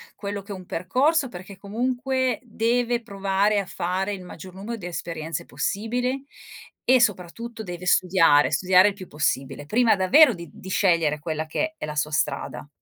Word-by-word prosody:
quello 200 0 -5
che 200 - -11
è - - -4
un 185 -1 -10
percorso 265 - +1
perché 185 0 -10
comunque, 255 +4 -1
deve 240 +1 0
provare 200 -1 +1
a 200 - -2
fare 185 +3 -2
il 190 -2 -7
maggior 180 +1 -10
numero 205 +5 -6
di 190 - -9
esperienze 165 -1 -5
possibili 245 +6 -2 0.6
e 255 0 +5
soprattutto 225 +2 -1
deve 180 -2 -7
studiare, 170 -5 +4
studiare 185 +1 +5
il - - -5
più 190 -2 -10
possibile 140 -1 -2
prima 230 +8 +3
davvero 245 +9 +6
di 170 -4 -9
di 190 - -10
scegliere 165 -6 +2
quella 155 +1 -3
che 315 - -2
è - - -4
la 150 0 -6
sua 150 0 -1
strada. 150 - -2
195 Hz, 170 wpm, -24 LUFS, 175-235 Hz, 0.6 s, davvero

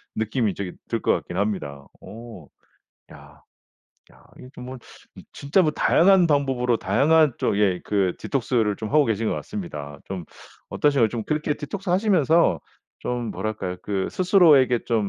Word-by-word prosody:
느낌이 110 -1 -1
되게 95 -3 -5 0.2
들 - - -2
것 - - +2
같긴 - - -5
합니다. 75 -9 -3 0.2
오. 110 - -11 0.6
야 70 0 -16 0.7
야 - - -22
이게 125 - -12
좀 125 - -9
뭐 130 +1 -8 0.5
진짜 145 +7 +1
다양한 185 +1 +4
방법으로 135 -5 +1
다양한 145 +7 +3
쪽의 100 -3 +1
그 95 -3 0
디톡스를 115 -6 -1
좀 110 - -5
하고 150 +3 +3
계신 110 -2 -1
것 - - -1
같습니다. 75 - -7
좀 95 -3 -6 0.5
어떠신가요? 140 -6 +2
좀 115 -2 -5
그렇게 150 0 -1
디톡스를 175 +6 -5
하시면서 170 - +3 0.4
좀 120 -1 -3
뭐랄까요? 95 -2 -4
그 100 -2 -2
스스로에게 155 - +4
좀 110 -4 0
120 Hz, 310 characters per minute, -23 LUFS, 100-150 Hz, 0.7 s, 다양한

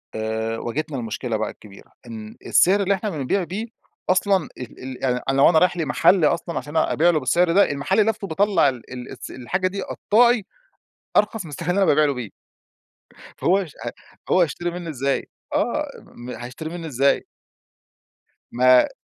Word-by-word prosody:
آآ 110 +1 -2
واجهتنا 145 +6 -3
المشكلة 115 -4 -3
بقى - - -2
الكبيرة، 100 -2 -15 0.2
إن 110 -2 -8
السعر 190 +3 +4
اللي 200 +1 +2
إحنا 200 +2 -2
بنبيع 160 +4 -1
بيه 195 +7 -4 0.4
أصلًا 190 -2 +2
ال 125 - -9
ال 130 0 -7
يعني 125 -1 +1
أنا 135 - +1
لو 140 - +7
أنا 160 -2 +5
رايح 180 -1 +2
لمحل 160 +2 +3
أصلًا 170 +2 0
عشان 145 +2 -4
أبيع 160 +2 +3
له 160 - +3
بالسعر 165 +6 +2
ده، 195 0 +4
المحل 165 +9 +1
لفته 215 -2 -3
باطلّع 195 -3 +3
ال 130 -1 -8
ال 125 -1 -8
الس - - -8
الحاجة 185 +9 -2
دي 195 +1 -4
قطّاعي 235 +1 +2 0.7
أرخص 210 -1 +2
من 160 - -9
السعر 165 +4 -4
اللي 185 - +1
أنا - - +4
بابيع 150 +1 +4
له 145 -1 +1
بيه. 120 -5 -6 1.1
فهو 185 - +3
هيش 180 -7 -5 0.6
هو 185 - +5
هيشتري 175 +1 -1
منه 175 -1 -6
إزاي؟ 140 -2 -1 0.3
آه - - 0 0.2
م 120 +1 -11
هيشتري 125 +5 -7
منه 170 -1 -6
إزاي؟ 140 0 +2 1.3
ما 125 +1 +5
155 Hz, 175 wpm, -22 LUFS, 130-185 Hz, 1.3 s, لو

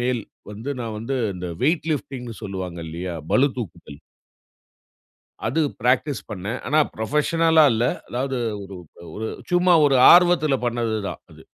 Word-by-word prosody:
மேல் 120 -1 -1 0.3
வந்து 110 +7 -6
நான் 115 -2 -4
வந்து 130 +5 -3 0.2
இந்த 90 0 -6
வெய்ட் 160 +2 +1
லிஃப்டிங்னு 125 -4 -5
சொல்லுவாங்க 95 -3 -5
இல்லயா? 85 +2 -5 0.2
பளுதூக்குதல். 125 - -1 1.5
அது 135 +8 0 0.2
ப்ராக்டீஸ் 130 +3 +1
பண்ணேன். 105 +5 -4
ஆனா 150 - +3 0.2
புரொஃபஷனல்லா 160 +7 +3
இல்ல. 115 +1 0 0.2
அதாவது 130 +1 -2 0.2
ஒரு 95 0 -10 0.4
ஒரு 110 +1 -4 0.2
சும்மா 175 0 +4
ஒரு 135 - +3 0.2
ஆர்வத்துல 175 -5 +5
பண்ணது 115 -2 -1
தான் - - -7
அது. - - -15
125 Hz, 130 wpm, -22 LUFS, 105-150 Hz, 1.5 s, ஆர்வத்துல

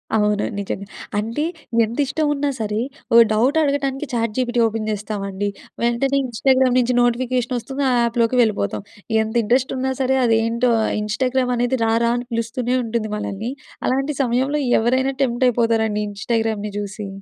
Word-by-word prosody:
అవును. 210 -1 +2
నిజంగా. 200 0 -4 0.3
అంటే, 230 +7 -2 0.4
ఎంతిష్టం 280 +6 -1
ఉన్నా 285 0 -1
సరే, 210 0 -1 0.3
ఓ - - +6 0.2
డౌట్ 255 +8 +2
అడగటానికి 280 -1 -1
చాట్‌జీపీటీ 240 +1 0
ఓపెన్ 220 0 -3
చేస్తామండి. 205 -1 -3 0.3
వెంటనే 250 +4 +1
ఇన్‌స్టాగ్రామ్ 255 +1 +2
నుంచి 250 0 +1
నోటిఫికేషనొస్తుంది 250 +2 -1
ఆ - - +2
యాప్‍‌లోకి 235 +1 +1
వెళ్ళిపోతాం. 105 - 0 0.4
ఎంత 220 +2 -6
ఇంట్రెస్టున్నా 260 +3 +1
సరే, 265 0 +2
అదేంటో, 230 +1 +2 0.3
ఇన్‌స్టాగ్రామనేది 250 +2 0
రారా! 230 +1 +2
అని 245 0 -5
పిలుస్తూనే 240 +2 -1
ఉంటుంది 225 -1 -2
మనల్ని. 210 +3 -4 0.3
అలాంటి 275 +3 0
సమయంలో 260 +4 +1 0.2
ఎవరైనా 260 +4 +1
టెంప్ట్ 240 0 +1
అయిపోతారండి 225 -3 +1
ఇన్‌స్టాగ్రామ్‌ని 215 0 -2
చూసి. 205 0 -5
235 Hz, 125 wpm, -21 LUFS, 220-260 Hz, 0.4 s, ఓ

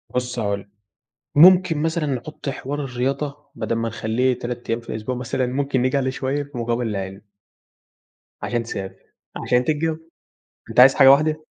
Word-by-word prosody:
بُصّ 125 -1 -2
هاقول 100 -2 -1
لك، 100 - -15 0.7
ممكن 180 -1 +6
مثلًا 160 0 0
نحط 140 +2 -4
حوار 145 +2 -4
الرياضة 140 +3 -3
بدل 115 - -2
ما 115 0 -1
نخلّيه 120 +3 0
3 120 0 -6
أيام 115 +1 0
في - - -16
الأسبوع 110 +4 -4
مثلًا، 125 +1 -2
ممكن 135 0 -1
نيجي 130 +2 +1
عليه 130 -1 0
شوية 135 +2 -2
في 145 -2 -11
مقابل 120 0 -1
العِلم. 95 -1 -5 1.2
عشان 120 -1 -2
تسافر، 100 -4 -8 0.2
عشان 125 0 +1
تتجوّز، 155 +1 0 0.7
أنت - - +1
عايز 130 +2 +8
حاجة 135 -1 +8
واحدة؟ 155 +2 +2
130 Hz, 160 wpm, -22 LUFS, 120-145 Hz, 1.2 s, عايز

